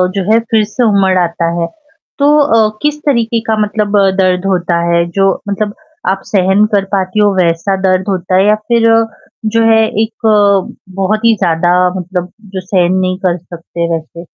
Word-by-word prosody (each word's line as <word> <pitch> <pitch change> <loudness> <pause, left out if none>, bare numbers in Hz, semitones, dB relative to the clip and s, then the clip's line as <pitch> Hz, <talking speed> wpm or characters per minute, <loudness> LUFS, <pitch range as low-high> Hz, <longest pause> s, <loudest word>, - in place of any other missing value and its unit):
जो 195 - -1
है 225 - +5
फ़िर 220 -1 +3
से 250 - -1
उमड़ 195 -4 +2
आता 170 -1 -1 0.2
है। 165 - -1 0.5
तो 295 +1 +4
अ, 220 -7 +2
किस 300 0 -1
तरीके 235 -4 +1
का 220 - +1
मतलब 210 -1 -1
अ, 195 -1 +3
दर्द 185 0 +1
होता 175 -2 0
है 170 0 +2
जो 195 -1 +3 0.2
मतलब 205 +1 -3 0.3
आप 195 0 -1
सहन 195 +1 +2
कर 195 - +2
पाती 190 +2 -1
हो 205 -1 +3
वैसा 175 +2 0
दर्द 185 0 +1
होता 185 -1 -1
है? 195 - +3
या 210 - +4
फ़िर 230 +1 +1
अ, 225 0 +3 0.5
जो 230 - +4
है 220 0 +4 0.2
एक 220 0 -7
अ, 200 -2 +1
बहुत 215 +4 0
ही 225 -1 +4
ज़्यादा 175 +1 +1 0.2
मतलब 180 0 -5 0.2
जो 185 - -2
सहन 180 -2 +1
नहीं 185 0 -1
कर 175 0 0
सकते 170 0 -6
वैसे? 165 +1 -9
195 Hz, 190 wpm, -13 LUFS, 180-215 Hz, 0.5 s, है